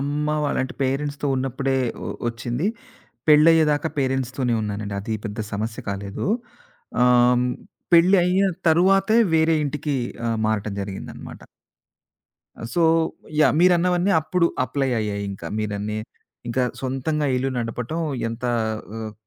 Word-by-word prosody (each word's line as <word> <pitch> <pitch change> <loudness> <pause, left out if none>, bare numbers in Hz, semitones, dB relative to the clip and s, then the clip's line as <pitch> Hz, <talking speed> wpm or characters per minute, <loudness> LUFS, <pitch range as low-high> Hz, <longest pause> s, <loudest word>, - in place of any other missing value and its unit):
అమ్మ 145 +2 -1 0.2
వాళ్ 145 - 0
అంటే, 130 - -6
పేరెంట్స్‌తో 145 +2 -1
ఉన్నప్పుడే, 135 +1 -1 0.3
ఒ - - -4 0.2
ఒచ్చింది. 120 - -3 0.6
పెళ్ళయ్యేదాకా 155 0 +5
పేరెంట్స్‌తోనే 130 -2 0
ఉన్నానండి 105 -1 -4
అది 110 +2 -3
పెద్ద 105 +1 -7
సమస్య 110 +4 -3
కాలేదు. 100 0 -4 0.8
ఆహ్, 125 0 +5 0.2
హ్మ్. 125 0 +1 0.5
పెళ్లయ్య 180 +2 +5 0.3
తరువాతే 195 +6 +4 0.2
వేరే 160 0 +4
ఇంటికి 145 0 -2 0.3
ఆ! - - +1 0.2
మారటం 110 -1 -1
జరిగిందనమాట. 100 -1 -7 1.2
ఆ! - - -9
So 175 - +2 0.6
yeah! - - +5
మీరన్నవన్నీ 180 +1 +3
అప్పుడు 170 +2 +1 0.2
అప్లై 135 0 -1
అయ్యాయి 100 -1 -3
ఇంకా 95 - -7
మీరన్నీ. 105 0 -3 0.5
ఇంకా 125 +2 0 0.2
సొంతంగా 135 +3 -1
ఇల్లు 135 +1 0
నడపటం 120 +7 -3 0.3
ఎంత 115 +2 -7 0.5
ఆహ్, 110 0 -5
ఆహ్, 105 - -7
135 Hz, 120 wpm, -23 LUFS, 110-160 Hz, 1.2 s, పెళ్ళయ్యేదాకా